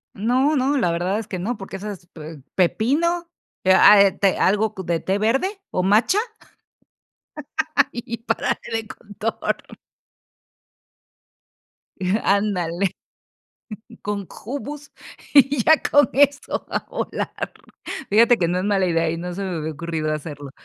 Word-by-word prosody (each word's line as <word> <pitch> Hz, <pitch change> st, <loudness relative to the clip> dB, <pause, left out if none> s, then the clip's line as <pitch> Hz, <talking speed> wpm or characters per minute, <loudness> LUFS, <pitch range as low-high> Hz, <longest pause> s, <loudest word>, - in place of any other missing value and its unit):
No, 255 Hz, +8 st, +2 dB
no, 275 Hz, +1 st, +1 dB
la 180 Hz, -10 st, +1 dB
verdad 180 Hz, +5 st, -1 dB
es 225 Hz, -, -7 dB
que 185 Hz, -, -4 dB
no, 215 Hz, +5 st, -3 dB
porque 195 Hz, 0 st, -8 dB
esas, 195 Hz, -3 st, -8 dB
pe 155 Hz, -2 st, -10 dB
pepino, 310 Hz, -, +1 dB, 0.3 s
eh, 185 Hz, -, +5 dB
a 200 Hz, +2 st, +8 dB
eh, 200 Hz, -1 st, +5 dB
te 195 Hz, 0 st, +1 dB
algo 210 Hz, +3 st, +2 dB
co 190 Hz, -, -7 dB
de 170 Hz, -1 st, -1 dB
té 190 Hz, +3 st, -1 dB
verde, 270 Hz, -, 0 dB
o, 180 Hz, -, 0 dB
matcha, 210 Hz, -, +3 dB, 1.7 s
y 240 Hz, -, -5 dB
y -, -, -1 dB
parale 230 Hz, -, -1 dB, 0.2 s
de 225 Hz, -1 st, -2 dB
contar 210 Hz, +2 st, -3 dB, 2.7 s
Ándale. 195 Hz, -2 st, 0 dB, 1.1 s
Con 200 Hz, -2 st, -4 dB, 0.2 s
hummus 285 Hz, +4 st, -6 dB, 0.4 s
y 275 Hz, -3 st, +5 dB
ya 315 Hz, -, +6 dB, 0.2 s
con 290 Hz, -4 st, +5 dB
eso 285 Hz, +1 st, +2 dB
va -, -, -2 dB
a -, -, -3 dB
volar. -, -, -4 dB, 0.6 s
Fíjate 230 Hz, +3 st, +5 dB
que 170 Hz, -, +2 dB
no 175 Hz, +2 st, 0 dB
es 185 Hz, -, -2 dB
mala 200 Hz, -2 st, +2 dB
idea 165 Hz, -1 st, +1 dB
y 165 Hz, -, -3 dB
no 175 Hz, +1 st, -5 dB
se 200 Hz, -, -4 dB
me 185 Hz, -3 st, -3 dB
había 160 Hz, 0 st, -3 dB
ocurrido 155 Hz, 0 st, -3 dB
hacerlo. 145 Hz, -2 st, -7 dB
200 Hz, 145 wpm, -22 LUFS, 175-245 Hz, 2.7 s, a